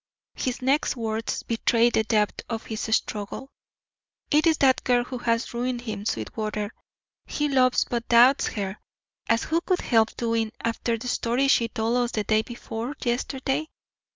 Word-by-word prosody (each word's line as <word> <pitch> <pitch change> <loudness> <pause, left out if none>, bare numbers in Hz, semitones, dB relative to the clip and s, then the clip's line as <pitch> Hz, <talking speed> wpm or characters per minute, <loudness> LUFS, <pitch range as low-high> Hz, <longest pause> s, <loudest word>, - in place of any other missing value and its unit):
His 255 0 -3
next 275 +3 +2
words 225 -1 -2
betrayed 230 +1 +2
the 220 - +3
depth 210 -2 +1
of 225 -1 -4
his 220 -1 -5
struggle: 210 +6 -4 0.8
"It 305 +3 +4
is 320 -1 +4
that 265 -2 +3
girl 245 -1 +3
who 250 0 -6
has 230 0 -1
ruined 245 0 -2
him, 210 -4 -5
Sweetwater. 210 - -3 0.5
He 295 - -1
loves 255 -3 +3
but 235 -1 -3
doubts 245 +4 +6
her, 200 -1 -4 0.5
as 230 0 +3
who 330 +2 0
could 365 0 0
help 225 -2 +2
doing 230 -2 -1
after 230 0 -1
the 240 +3 -7
story 245 +2 +1
she 235 -4 +4
told 225 +2 -1
us 245 -1 0
day 215 +1 +2
before 240 +3 -6
yesterday? 265 +4 -1
235 Hz, 155 wpm, -25 LUFS, 225-255 Hz, 0.8 s, doubts